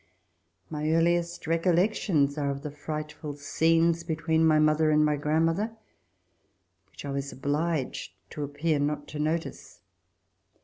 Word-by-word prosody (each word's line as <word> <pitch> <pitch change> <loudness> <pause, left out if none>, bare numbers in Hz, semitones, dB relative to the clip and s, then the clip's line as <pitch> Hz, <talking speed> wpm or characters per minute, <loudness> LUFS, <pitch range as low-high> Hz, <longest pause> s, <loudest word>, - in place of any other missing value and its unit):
My 150 0 -3
earliest 170 +1 +1
recollections 165 -3 +2
are 145 -2 -1
of 140 0 -4
the 150 - -5
frightful 150 0 -6
scenes 165 +3 +2
between 160 -1 0
my 155 -1 +5
mother 155 +1 +3
and 150 0 +4
my 150 0 +2
grandmother, 165 +9 0 1.1
which 95 - -11
I 140 - -3
was 140 0 -3
obliged 145 +1 -2 0.2
to 150 - -4
appear 145 +2 -1
not 145 0 -1
to 150 - -6
notice. 160 +2 -3
155 Hz, 130 wpm, -28 LUFS, 145-165 Hz, 1.1 s, my